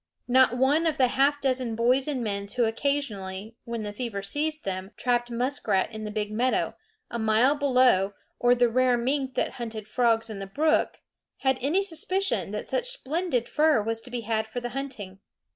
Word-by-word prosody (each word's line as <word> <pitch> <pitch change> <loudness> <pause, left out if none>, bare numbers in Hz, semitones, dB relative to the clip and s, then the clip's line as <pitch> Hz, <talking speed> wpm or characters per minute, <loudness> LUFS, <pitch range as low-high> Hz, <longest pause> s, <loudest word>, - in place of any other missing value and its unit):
Not 250 -1 +4
one 290 +6 +3
of 315 - 0
the 255 -2 +4
half 280 +3 +2
dozen 255 -4 0
boys 250 +4 +3
and 270 -5 -1
men 200 -2 -3
who 240 - +4
occasionally, 220 -5 -2
when 235 -2 -4
the 205 0 -5
fever 210 -3 -4
seized 305 +9 -1
them, 190 0 -3
trapped 240 -1 0
muskrat 240 -4 0
in 215 0 -6
the - - -4
big 210 0 -3
meadow, 245 +4 0 0.4
a 235 - -3
mile 220 +5 +4
below, 250 -9 +3 0.2
or 245 0 +4
the 245 0 +4
rare 250 +1 +3
mink 265 +2 -1
that - - 0
hunted 220 -2 -5
frogs 225 0 +2
in 215 -3 -6
the 195 - -6
brook, 310 +10 +1 0.4
had 265 -1 +2
any 320 +10 +2
suspicion 380 +2 -1
that - - -5
such - - -1
splendid 330 - -1
fur 305 -4 +3
was 225 +1 -2
to 250 - -10
be 245 -1 -3
had 220 0 -1
for 220 +3 -4
the 240 0 -4
hunting. 240 -8 -6
245 Hz, 190 wpm, -26 LUFS, 220-275 Hz, 0.4 s, Not